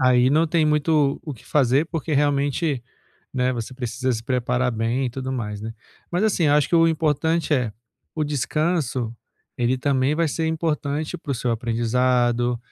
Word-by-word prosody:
aí 130 0 +4
não 160 +3 +3
tem 160 0 +2
muito 150 -1 +2
o 150 -4 -5
que 110 - -18
fazer, 140 +1 +2
porque 160 -2 -2
realmente, 145 -1 +1 0.5
né, 130 0 +1
você 115 +1 -5
precisa 125 0 -2
se 115 -2 -2
preparar 125 0 0
bem 115 +4 -1
e - - -3
tudo 130 +2 -5
mais, 105 -5 -4
né. 110 +1 -5 0.4
Mas 175 +4 +1
assim, 185 -7 +2
acho 145 -1 +3
que - - +2
o 165 0 +6
importante 160 0 +1
é 125 -5 +1 0.4
o 155 - 0
descanso, 145 -3 -1 0.4
ele 125 +1 +1
também 135 +2 +1
vai 165 0 +2
ser 160 +2 -1
importante 155 -2 -2
para 145 - -5
o - - 0
seu 120 0 -1
aprendizado, 120 +1 +1
135 Hz, 175 wpm, -23 LUFS, 125-155 Hz, 0.5 s, o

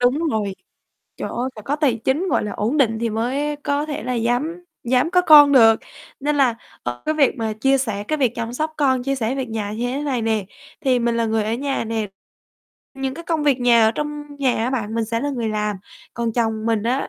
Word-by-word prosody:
Đúng 245 +3 +3
rồi, 205 -4 -1 0.6
trời - - -4
ơi, 245 +2 -2
phải 215 - -9
có 280 +7 -1
tài 290 -6 +2
chính, 320 +8 +1
gọi - - +1
là, 210 - -4
ổn 225 +8 -1
định 230 -6 +2
thì 230 0 -1
mới 270 +7 -1
có 285 +1 -1
thể 295 -2 -4
là 250 +2 -2
dám 255 +10 -1 0.2
dám 255 +6 +2
có 360 0 +4
con 295 -4 +8
được. 225 -4 +6 0.4
Nên 295 +1 0
là, 260 -4 +3 0.3
ờ, 120 0 -5
cái 310 - +1
việc 285 -3 +3
mà 220 -1 -1
chia 270 +5 +2
sẻ 220 -6 -2
cái 310 - +1
việc 255 -5 +2
chăm 230 0 -4
sóc 310 +5 -2
con, 265 -4 +2
chia 275 +2 -1
sẻ 250 -1 -1
việc 265 -2 -3
nhà 215 -2 -3
như 230 +3 -2
thế 260 +3 -2
này 265 -5 -1
nè, 220 -2 0 0.4
thì 260 -3 +2
mình 235 -1 0
là 230 - +1
người 220 -1 0
ở 215 - -1
nhà 270 +1 -2
nè, 220 -1 -2 0.9
những 270 -1 -3
cái 335 +3 -9
công 320 -3 -1
việc 275 -3 +2
nhà 235 -2 +5
ở - - +4
trong 295 -1 -5
nhà 260 -3 +2
á 250 - -1
bạn, 225 -4 -2
mình 230 -1 0
sẽ 230 +1 -2
là 285 - -1
người 240 -5 -2
làm. 210 -1 -1 0.4
Còn 235 -1 -2
chồng 225 -1 -1
mình 225 -2 +1
á, 250 +4 -1
245 Hz, 240 wpm, -21 LUFS, 225-285 Hz, 0.9 s, con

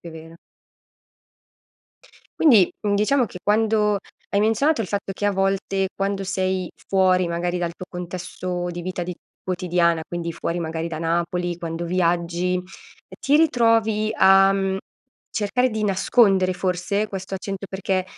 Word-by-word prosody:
è 170 - -9
vero. 160 +1 -11 2.0
Quindi, 225 - +6
mhmm, 205 -1 +1
diciamo 245 +6 +2
che 185 - -9
quando 210 0 +2 0.3
hai 200 - +1
menzionato 225 +6 +2
il - - -5
fatto 200 -1 -3
che, 205 - -5
a 205 - +4
volte, 195 0 0
quando 195 0 -2
sei 185 -1 -1 0.2
fuori 185 -2 +3
magari 175 +1 -1
dal 175 -1 -2
tuo 185 - -9
contesto 180 0 -5
di 175 0 -6
vita 185 0 -4
di 180 +1 -4 0.3
quotidiana 175 -2 +1
quindi 170 -1 -4
fuori 170 +1 -3
magari 165 0 -3
da 160 -2 -5
Napoli, 170 +1 -1
quando 170 0 -5
viaggi, 175 0 0
ehm, 180 - -1 0.6
ti 285 +2 +3
ritrovi 225 -7 +3
a, 195 -2 +6
mhmm, 195 -1 0 0.5
cercare 250 +4 0
di 220 -1 -3
nascondere 195 -1 +3
forse 185 +3 -1
questo 195 -1 -6
accento? 195 +1 -5
Perché 190 -1 -1
190 Hz, 145 wpm, -23 LUFS, 175-205 Hz, 2.0 s, Quindi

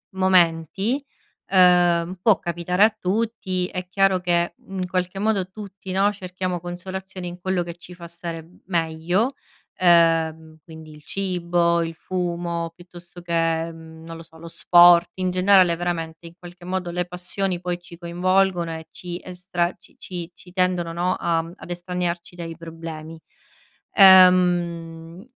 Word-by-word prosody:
momenti, 185 - +2 0.5
uhm, 180 -1 +4
può 215 -1 +4
capitare 175 +3 0
a 215 0 +4
tutti, 190 -2 -1
è 180 -1 -6
chiaro, 195 0 +3
mhmm, 185 - -2
che 175 -1 +1
in 190 -1 -4
qualche 185 +1 -2
modo 205 -3 0
tutti, 195 -1 -9
no, 195 +2 +2
cerchiamo 185 -2 -4
consolazioni 185 +1 -7
in 175 0 -8
quello 185 0 -1
che 170 -1 -8
ci 175 +1 -13
fa 170 -1 -10
stare 170 -1 -7
b 175 +3 -22
meglio, 170 +5 0 0.5
ehm, 165 -2 +3
quindi 160 0 -12
il 150 0 -15
cibo, 175 -3 0
il 165 0 -4
fumo, 170 -1 -3
piuttosto 175 0 -14
che, 165 -1 0
mhmm, 160 0 -13
non 165 - -8
lo - - -10
so, 160 0 -19
lo 170 - -10
sport; 175 +1 +6
in 185 -1 -1
generale, 185 -1 +4
veramente, 165 -1 -4
in 165 - -13
qualche 175 0 -13
modo 180 -1 -3
le 180 0 -2
passioni 180 +1 -2
poi 175 0 -3
ci 175 -1 -14
coinvolgono 180 0 +1
e 160 - -10
ci 175 -1 -7
estra 180 -1 -2
ci - - -22
ci 175 -2 -7
ci 180 0 -16
tendono, 180 -2 0
no, 180 +2 0
a 165 -1 +1
mhmm, 165 +1 -10
ad - - -11
estraniarci 175 0 -4
dai 165 -2 -7
problemi. 165 -1 -9 0.8
Ehm, 175 -3 +5
175 Hz, 155 wpm, -23 LUFS, 170-185 Hz, 0.8 s, sport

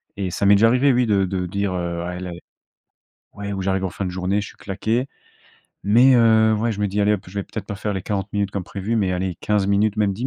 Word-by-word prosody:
et 95 -3 -3
ça 100 - -1
m'est 100 - +7
déjà 110 +3 +5
arrivé, 130 +3 +3
oui, 125 0 +2
de 100 -3 +2
de 90 -1 -2
dire, 100 +1 -2
heu: 85 -1 -3
«Ah 90 0 -4
elle 90 0 -6
a - - -6
é» 85 - -9 0.9
ouais, 100 0 -6
ou 95 -1 -3
j'arrive 95 0 0
en - - -2
fin 95 - -5
de 90 - -3
journée, 95 +3 -1
je 100 - -6
suis - - -15
claqué, 110 +6 -2 0.8
mais, 120 +6 +5
heu, 110 -1 +5
ouais, 115 +2 0
je 105 - -6
me 105 - +1
dis: 100 +2 -1
«Allez 105 +1 +3
hop, 100 - -5
je 90 - -13
vais 100 - -1
peut-être 110 - -7
pas 105 - -5
faire 105 0 -3
les 95 - -3
40 100 -1 -3
minutes 100 -1 0
comme 100 -2 -4
prévu, 100 +4 -3
mais 95 -4 +1
allez 90 -1 -2
15 105 -2 +1
minutes, 100 +1 +2
même 105 -2 +1
10 115 +7 -3
100 Hz, 280 wpm, -22 LUFS, 95-110 Hz, 0.9 s, m'est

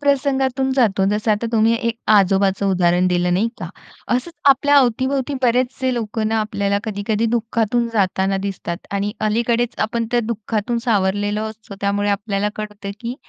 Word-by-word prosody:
प्रसंगातून 270 -2 +1
जातो, 205 -7 +3
जसं 210 +1 0
आता 210 +2 0
तुम्ही 225 +1 +3
एक 230 0 -2
अ, - - 0
आजोबाचं 195 0 +3
उदाहरण 180 -1 +2
दिलं 180 0 +1
नाही 215 +5 +1
का? - - -5 0.5
असंच 260 +7 -2 0.2
आपल्या 285 +2 +4
अवती-भवती 260 +2 +1
बरेचसे 255 +1 +1
लोकं 220 -1 -2
ना 225 - +1
आपल्याला 200 -1 -1
कधी-कधी 215 +1 -1
दुःखातून 230 +1 0
जाताना 195 -1 +1
दिसतात 175 -3 -5
आणि 200 +1 -1 0.2
अलीकडेच 235 +2 0
आपण 230 +1 -1
त्या 240 -1 +2
दुःखातून 225 +1 -2
सावरलेलो 205 -1 0
असतो. 215 -2 -12
त्यामुळे 205 +1 0
आपल्याला 200 0 -1
कळतं, 210 -2 -6
की 240 +1 -4
215 Hz, 155 wpm, -20 LUFS, 200-240 Hz, 0.5 s, आपल्या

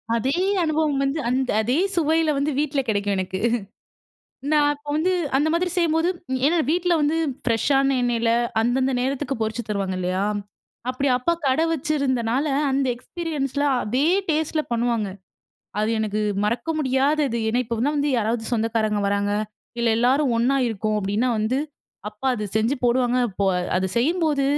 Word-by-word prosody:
அதே 260 +7 0 0.3
அனுபவம் 310 -3 +1
வந்து, 275 +3 -1
அந்த 255 +1 0
அதே 245 +7 +1 0.2
சுவையில 320 -1 +2
வந்து 285 +2 0
வீட்ல 295 -1 0
கெடைக்கும் 205 -1 0
எனக்கு 190 0 -3 1.1
நான் 295 -1 +4
அப்ப 290 0 -17
வந்து 330 +5 +1 0.3
அந்த 295 +3 +2
மாதிரி 355 +2 +1
செய்யும்போது 335 -1 +2 0.4
ஏனா 330 +4 +3
வீட்ல 350 +2 +2
வந்து 300 +2 +1 0.3
ஃபிரஷ்ஷான 270 +3 +2
எண்ணெயில 235 -1 +1 0.3
அந்தந்த 260 +3 +1
நேரத்துக்கு 270 +1 -2
பொறிச்சு 220 +2 -1
தருவாங்க 195 -3 -2
இல்லையா? 185 +2 -1 0.7
அப்டி 255 +2 -1
அப்பா 295 +7 +1
கடை 270 +5 +2
வச்சிருந்தனால 270 -4 0 0.3
அந்த 270 0 +1
எக்ஸ்பீரியன்ஸ்ல 285 0 -3 0.2
அதே 255 +8 +1 0.2
டேஸ்ட்ல 315 0 0
பண்ணுவாங்க. 235 -2 0 0.7
அது 215 +1 +1
எனக்கு 215 -1 -1 0.2
மறக்க 235 +9 -1
முடியாதது. 275 -1 +1
ஏன்னா, 240 +3 +1
இப்ப 235 0 -3 0.2
வந்து 295 -1 0
யாராவது 225 +1 0
சொந்தக்காரங்க 220 -2 0
வராங்க, 200 0 0 0.5
இல்ல 235 0 +1
எல்லாரும் 260 +2 +3
ஒண்ணா 245 +4 +2
இருக்கோம். 215 -1 -1
அப்டீன்னா 205 +5 0
வந்து 220 +5 0 0.5
அப்பா 210 +5 -7
அத 210 -3 -3
செஞ்சு 225 +5 +2
போடுவாங்க. 245 0 +2
அப்போ 200 +1 -2 0.3
அது 185 +1 +1
செய்யும்போது 300 +2 +1
260 Hz, 140 wpm, -23 LUFS, 225-295 Hz, 1.1 s, நான்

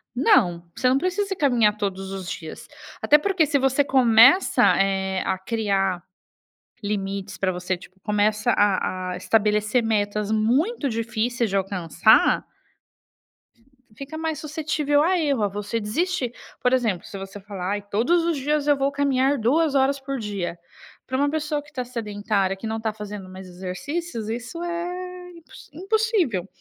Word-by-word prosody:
Não, 180 -10 +3
você 255 - +1
não 265 - +3
precisa 385 +4 -1
caminhar 240 -9 +3
todos 195 -2 -3
os 190 -3 -6
dias, 160 -2 -8 0.3
até 300 - +6
porque 370 -1 +1
se 285 -1 +1
você 270 +2 +2
começa, 255 - +5 0.2
eh, 190 -1 0
a 190 - 0
criar 195 -4 -1 0.8
limites 195 -1 -3
pra 190 -1 0
você, 180 +1 -2
tipo 185 +2 -17
começa 210 +1 +1
a 185 -2 +1
a - - -5
estabelecer 210 +4 +1
metas 210 -1 0
muito 270 - +1
difíceis 235 0 -1
de 195 - -2
alcançar 195 +1 +3 1.5
fica 280 +5 -8
mais 320 -2 -2
suscetível 300 -1 0
a 360 +3 +2
erro, 285 -8 0
a - - +3
você 205 +3 -3
desistir, 255 - -1 0.3
por 250 - +2
exemplo, 225 -9 0
se 200 - -8
você 195 +1 -8
fala: 195 -1 -5
"Aí, 205 0 -1
todos 240 - +1
os 335 -3 0
dias 295 +2 -1
eu 290 -1 +4
vou 275 +1 +1
caminhar 280 0 +1
2 285 +6 +2
horas 275 +1 +2
por 270 -1 -4
dia.", 195 -5 -4 0.5
pra 260 - -2
uma 285 +1 +2
pessoa 300 -1 -2
que 300 0 -20
tá 250 - -3
sedentária, 210 -4 -1
que 220 +4 -7
não 220 0 -3
tá 220 -1 -2
fazendo 205 -3 -8
mais 185 0 -10
exercícios 215 - -5
isso 245 +9 -5
é 360 +1 -5
impossi 335 -2 -15
impossível, 380 - 0
230 Hz, 155 wpm, -23 LUFS, 200-290 Hz, 1.5 s, até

